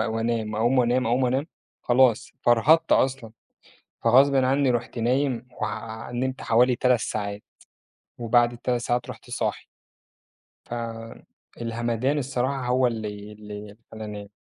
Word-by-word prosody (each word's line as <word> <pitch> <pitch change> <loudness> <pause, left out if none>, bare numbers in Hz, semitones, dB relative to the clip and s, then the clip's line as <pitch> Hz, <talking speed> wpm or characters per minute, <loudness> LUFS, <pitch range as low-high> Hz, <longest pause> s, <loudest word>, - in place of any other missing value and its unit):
وأنام، 115 -1 -1
أقوم 120 +4 +2
وأنام، 125 0 +2
أقوم 125 +3 +2
وأنام 130 +4 0 0.4
خلاص، 125 -1 +3
فرهدت 120 +8 +4
أصلًا، 130 -4 +2 0.7
فغصبٍ 135 +4 +5
عنّي 135 +1 +3
رُحت 120 0 -2
نايم 125 +1 0
وع 110 +1 -5
نمت 130 +2 -2
حوالي 125 +2 +3
3 125 -2 +3
ساعات، 100 -1 -4 0.8
وبعد 120 +1 +3
ال3 120 0 -2
ساعات 120 0 -1
رُحت - - -12
صاحي. - - -2 1.0
فالهمدان 115 +2 -4
الصراحة 130 -1 -2
هو 125 0 +3
اللي 105 -2 -5
اللي 105 0 -10
خلّاني 105 -2 -7
120 Hz, 115 wpm, -25 LUFS, 115-130 Hz, 1.0 s, فغصبٍ